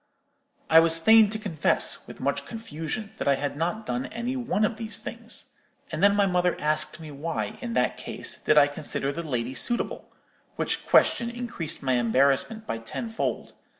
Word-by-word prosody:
"I 160 - +8
was 165 0 +6
fain 220 +5 +6
to 220 - -3
confess, 185 -9 +1
with - - -11
much - - -1
confusion, 210 -1 -5
that - - -2
I 140 - +5
had 140 +1 -3
not 175 +8 -2
done 255 +5 -2
any 235 +3 -4
one 230 -5 0
of 215 +1 -2
these 225 -1 -3
things. - - -5 0.4
And 155 +1 -3
then 200 0 +5
my 205 -1 +4
mother 180 -1 +1
asked 155 +2 0
me 155 -2 -9
why, 155 +4 -4
in 235 -2 -4
that - - +1
case, - - -5
did 155 - +2
I 145 - +8
consider 145 -1 -3
the 170 - -4
lady 125 -5 -3
suitable,—which 240 - -3
question 235 0 +4
increased 235 -12 -6
my 130 -2 +2
embarrassment 140 - +2
by 115 - -3
tenfold. 225 - -4
175 Hz, 175 wpm, -26 LUFS, 145-220 Hz, 0.4 s, I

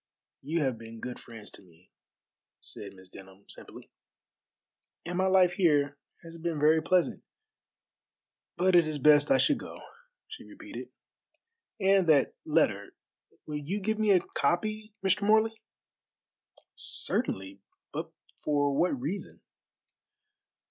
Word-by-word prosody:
"You 155 +3 -1
have 130 -4 -1
been 115 0 -10
good 125 +1 -6
friends 115 -3 -10
to - - -12
me," 90 -1 -23 0.7
said 100 - -5
Miss 95 0 -15
Denham 95 +1 -14
simply, - - -9 1.1
"and 175 +1 -4
my 190 +1 +2
life 185 -2 +5
here 145 -6 +2 0.3
has 165 0 -11
been 165 -2 -2
very 155 +2 +4
pleasant; 180 +2 +1 1.3
but 185 0 +3
it 170 -2 +6
is 155 -1 -2
best 145 +1 +5
I - - +5
should 290 - +3
go," - - -9 0.5
she 440 - -10
repeated, - - -10 0.9
"and 195 -3 +3
that 145 -4 +4
letter, 125 -11 +1 0.5
will 150 -1 -4
you 170 +8 -3
give 220 +2 -1
me 215 -1 +2
a 185 -3 +6
copy, 215 +5 -1
Mr. 190 +2 +3
Morley?" 220 +2 +3 1.1
"Certainly, 95 +1 -3 0.3
but - - -4 0.3
for 145 -1 +1
what 155 -4 +1
reason?" 160 +11 -5
155 Hz, 130 wpm, -29 LUFS, 130-190 Hz, 1.3 s, it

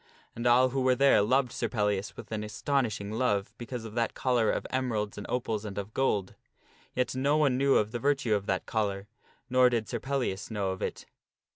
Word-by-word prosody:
And 120 +1 -1
all 125 +2 +5
who 135 +1 -1
were 130 0 +3
there 140 -4 +5
loved 125 +4 +2
Sir 115 - -2
Pellias 105 -2 -1
with - - -10
an 105 -1 -2
astonishing 110 -2 -1
love 110 -4 0
be 120 - -7
cause 120 -2 -5
of 110 - -8
that 115 0 -1
collar 120 -4 +2
of - - -1
emeralds 115 -6 -1
and 105 - -7
opals 115 -4 -1
and 100 -2 -7
of 100 +2 -5
gold. 105 -8 0 0.6
Yet 125 0 0
no 140 +3 +2
one 145 -4 +3
knew 135 +1 +3
of 105 0 +2
the 120 - -3
virtue 135 -4 +1
of 100 -1 -1
that 95 -1 -1
collar, 100 -2 -2 0.4
nor 125 0 +5
did 115 -3 -1
Sir 120 - -3
Pellias 130 -8 -2
know 100 -4 -1
of 95 - -6
it. - - -4
115 Hz, 215 wpm, -29 LUFS, 105-130 Hz, 0.6 s, all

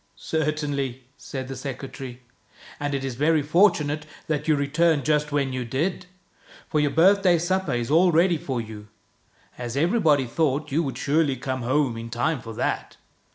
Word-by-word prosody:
" - - -41
Certainly," 145 -5 -2
said 130 -2 -6
the 135 - -6
secretary. 130 -1 -7 0.3
" - - -20
And 145 -1 -2
it 135 0 -3
is 135 - -3
very 150 +4 +2
fortunate 155 -2 +2 0.2
that 150 -1 -2
you 155 - +4
returned 145 0 +2
just 150 0 +1
when 140 -2 0
you 130 -1 -2
did. 160 +10 -2 0.6
For 155 - 0
your 150 -1 +2
birthday 180 +3 +4
supper 175 -2 0
is 120 +2 -2
all 175 +3 +5
ready 170 +1 +3
for 130 -4 -3
you, 110 -2 -8 0.7
as 120 +1 -4
every 175 +11 +2
body 150 -8 +3
thought 145 +3 -1
you 155 +5 +2
would 135 -5 -3
surely 145 -1 +1
come 130 0 -3
home 130 -1 +1
in 115 0 -6
time 120 +4 -1
for 115 -1 -8
that. - - -2
145 Hz, 180 wpm, -24 LUFS, 130-160 Hz, 0.7 s, all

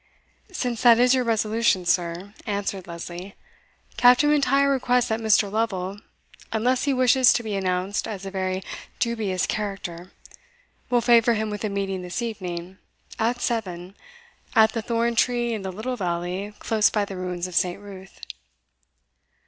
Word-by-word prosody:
"Since 245 -10 -3
that 235 -2 +7
is 250 +1 +5
your 260 -1 +2
resolution, 220 -4 +1
sir," 175 +3 -1
answered 200 -3 -3
Lesley, 175 +3 -8 0.6
"Captain 250 +5 +6
M'Intyre 280 -1 +3
requests 250 -3 +1
that 220 0 0
Mr. 210 -2 +3
Lovel, 200 -3 -2 0.5
unless 245 +4 +1
he 285 - +2
wishes 255 -1 +5
to 240 - -1
be 215 -2 -4
announced 190 0 -1
as 200 -3 -6
a 195 - -5
very 185 -1 -2 0.3
dubious 215 -6 -1
character, 190 -4 -5 0.8
will 245 -1 +3
favour 235 -1 +4
him 215 0 -2
with 210 +1 -5
a 215 - -1
meeting 195 -1 -3
this 180 +4 -5
evening, 185 -4 -6 0.4
at 240 +2 0
seven, 185 -5 -3 0.6
at 220 0 +6
the 230 - -2
thorn 235 +1 0
tree 240 0 +1
in 215 - -3
the 190 -1 -4
little 220 +7 -4
valley 180 +2 -3
close 220 -2 +2
by 210 -2 0
the 195 - -8
ruins 180 -1 -4
of 180 - -7
St. 180 +2 +1
Ruth." 195 -2 -12
210 Hz, 155 wpm, -24 LUFS, 185-235 Hz, 0.8 s, that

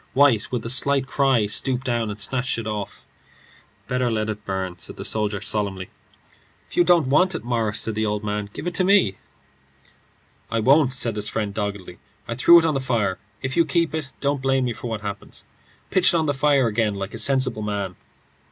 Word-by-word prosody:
White, 130 -5 +3
with 125 -3 -3
a - - -3
slight 135 +1 +2
cry, 135 -5 +2
stooped 125 +5 -1
down 120 -3 -1
and 105 +1 -6
snatched 125 +4 -1
it 115 - -5
off. 105 -2 -5 0.8
"Better 125 -1 0
let 110 -1 -1
it 105 0 -8
burn," 95 -2 -4
said - - -7
the - - -6
soldier, 105 -2 -1
solemnly. 100 -3 -2 0.8
"If - - -12
you 175 - +5
don't 175 -3 +4
want 185 +6 +3
it, - - -5
Morris," 115 -3 0
said 110 - -1
the 110 +1 -1
other, 105 0 -2
"give - - -7
it 175 - -2
to 185 - +2
me." 185 - +3 1.3
"I 115 - 0
won't," 135 +4 +4
said 120 -4 0
his 105 0 -1
friend, 105 -2 -3
doggedly. 100 -4 -5 0.3
"I 115 - -3
threw 155 +8 +7
it 165 - +4
on 160 - +1
the 135 - 0
fire. 115 -8 -1 0.2
If 130 0 -2
you 170 - +5
keep 165 0 0
it, 155 -4 -4
don't 140 -1 -1
blame 135 -1 +1
me 120 - -1
for 120 - -7
what 110 -2 -4
happens. 100 -1 -7 0.5
Pitch 185 -1 +4
it - - +5
on 160 - +1
the 145 - +1
fire 140 -1 +3
again 110 -2 0
like 100 +1 -5
a 115 - -5
sensible 130 -4 +2
man." 100 -3 -3
115 Hz, 205 wpm, -23 LUFS, 105-135 Hz, 1.3 s, threw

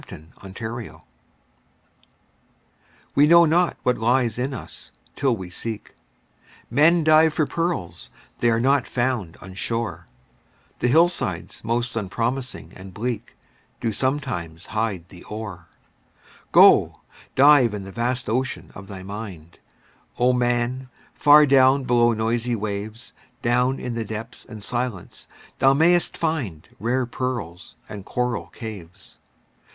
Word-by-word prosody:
HIDDEN 80 +2 -12 0.2
GEMS 110 -8 -7 2.1
We 145 +2 +5
know 170 +1 +7
not 170 +2 +2
what 125 -2 +1
lies 120 0 +1
in 130 +3 -1
us, 130 - -8 0.3
till 130 -5 +1
we 90 -2 -8
seek; 110 +3 -6 0.8
Men 160 +6 +4
dive 155 0 +5
for 155 - +2
pearls—they 130 - -3
are 115 0 +2
not 135 +1 +2
found 120 -9 -2
on 95 0 -10
shore, 115 +4 -3 0.7
The - - +1
hillsides 155 - +1
most 120 +2 -1
unpromising 115 +5 -3
and 95 0 -11
bleak 120 0 -4 0.4
Do 115 - -1
sometimes 95 - -3
hide 105 -6 -2
the 90 -2 -13
ore. 105 -6 -7 0.8
Go, - - +6 0.4
dive 135 -5 +6
in 100 - -6
the 95 - -9
vast 120 +3 -2
ocean 130 +4 -2
of 95 +1 -11
thy 95 -2 -9
mind, 95 -5 -9 0.6
O 125 +1 +3
man! 125 +1 0 0.2
far 150 0 +7
down 135 0 +5
below 120 -1 +3
the - - -5
noisy 115 +2 0
waves, 105 +2 -5 0.3
Down 125 +2 +2
in 125 - -5
the 115 -1 -2
depths 110 +2 -7
and 110 -2 -10
silence 120 -5 -4 0.3
thou 135 +1 +5
mayst 175 +3 +3
find 130 - -3
Rare 125 +3 0
pearls 120 -9 -5
and 100 -2 -8
coral 125 +3 -2
caves. 100 -5 -10
120 Hz, 125 wpm, -23 LUFS, 105-130 Hz, 2.1 s, know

